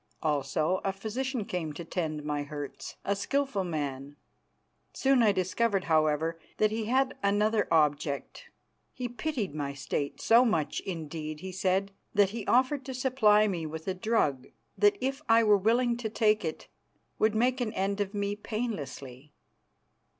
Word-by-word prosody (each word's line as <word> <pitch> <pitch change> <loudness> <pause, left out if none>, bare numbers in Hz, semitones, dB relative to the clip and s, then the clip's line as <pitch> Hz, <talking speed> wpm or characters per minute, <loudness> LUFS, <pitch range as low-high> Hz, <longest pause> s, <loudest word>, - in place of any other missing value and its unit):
Also 155 +4 0
a 195 - +1
physician 225 +4 -3
came 165 -6 -3
to 165 +3 -7
tend 155 -3 -3
my 150 -1 -1
hurts, 145 -1 -7
a 200 - +1
skilful 270 0 -1
man. 145 -4 -4 0.8
Soon 265 -2 +3
I 215 -3 +5
discovered, 195 +2 0
however, 160 +1 +1 0.2
that 215 0 +3
he 220 0 -2
had 260 +3 +1
another 210 +2 +2
object. 150 - 0 0.5
He 250 - -4
pitied 240 - -3
my 145 -2 -3
state, 140 +1 -3
so 230 +2 +6
much, 165 - 0
indeed, 155 -3 -5
he 190 - -6
said, 190 +1 0 0.2
that 200 -1 +4
he 225 -2 -6
offered 260 +3 +3
to 265 - -5
supply 220 -5 +4
me 170 -5 -2
with 160 +2 -7
a 190 - +1
drug 185 - 0 0.3
that, 415 -1 +4
if 270 +2 -1
I 225 0 +6
were 210 -1 +6
willing 235 +4 +2
to 235 -2 -3
take 215 -1 +2
it, 160 -2 -4 0.5
would 215 0 +3
make 250 +3 +2
an 225 -3 -1
end 200 0 -1
of 205 +1 -3
me 200 0 -1
painlessly. 150 - -5
200 Hz, 160 wpm, -29 LUFS, 155-230 Hz, 0.8 s, so